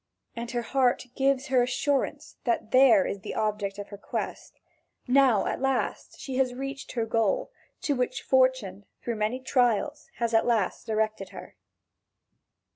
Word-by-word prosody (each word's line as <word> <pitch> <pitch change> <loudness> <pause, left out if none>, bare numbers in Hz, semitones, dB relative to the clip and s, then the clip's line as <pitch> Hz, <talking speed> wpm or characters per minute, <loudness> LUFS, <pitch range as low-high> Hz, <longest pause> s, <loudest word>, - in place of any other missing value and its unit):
And 235 0 -5
her 240 -1 -2
heart 255 +1 +1
gives 270 0 +1
her 255 -2 +4
assurance 270 +3 -1
that 235 -3 -1
here 255 -7 +6
is 200 - -3
the - - -6
object 205 -2 -1
of 205 0 -7
her 200 -1 -9
quest; - - -5 0.5
now 255 -5 +4
at - - -2
last 270 -1 -1
she 265 -2 -5
has 255 -2 +1
reached 275 +1 -6
her 230 -2 0
goal, 235 - 0 0.3
to 290 - +1
which 250 -2 -2
Fortune 255 -7 +2 0.2
through 235 -2 -2
many 215 +4 -1
trials 255 +3 +1
has 235 -1 -1
at 225 - +3
last 220 -6 0
directed 215 -3 -1
her. - - -11
245 Hz, 155 wpm, -27 LUFS, 220-265 Hz, 0.5 s, here